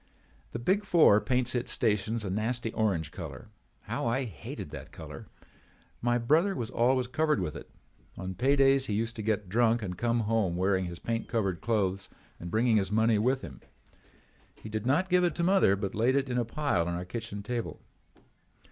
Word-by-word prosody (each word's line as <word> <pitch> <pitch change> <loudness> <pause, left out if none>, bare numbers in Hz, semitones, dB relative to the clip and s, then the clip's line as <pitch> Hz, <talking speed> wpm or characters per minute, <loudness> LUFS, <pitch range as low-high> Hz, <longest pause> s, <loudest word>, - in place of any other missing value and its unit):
"The - - -4
Big 190 - +1
Four 160 - +5
paints 125 -1 0
its 125 0 -1
stations 110 -1 0
a 95 - -2
nasty 115 +3 -2
orange 90 -8 0
color. 75 -9 -8 0.3
How - - -3
I 130 +4 +1
hated 85 - -7
that 70 -3 -9
color! - - -10 0.7
My 120 0 +2
brother 155 +11 +2
was 115 -4 -4
always 125 +2 +2
covered 150 +2 +1
with 85 -5 -3
it. - - -9 0.5
On 95 0 -5
pay 135 +8 +2
days 135 -1 +4
he 105 - -1
used 115 +2 -1
to - - -3
get 105 -2 -1
drunk 115 +3 +2
and 90 -3 -4
come 120 +4 0
home 105 -5 0
wearing 95 0 +1
his 85 -1 -6
paint 115 +3 -3
covered 100 -8 -1
clothes 100 -4 -1 0.3
and 85 - -6
bringing 110 +3 +3
his 95 -1 0
money 110 0 +3
with 130 +4 +1
him. 65 -3 -9 0.9
He 110 - -10
did 110 +2 -3
not 160 +8 +2
give 180 0 +3
it 175 -3 +1
to 170 - -1
mother 185 - +4
but 100 -1 -4
laid 120 +5 +2
it 135 -2 0
in 125 - +1
a 120 - 0
pile 115 - 0
on 85 - -2
our 90 +1 -4
kitchen 100 0 -6
table. 120 +2 -4
115 Hz, 195 wpm, -29 LUFS, 100-125 Hz, 0.9 s, Four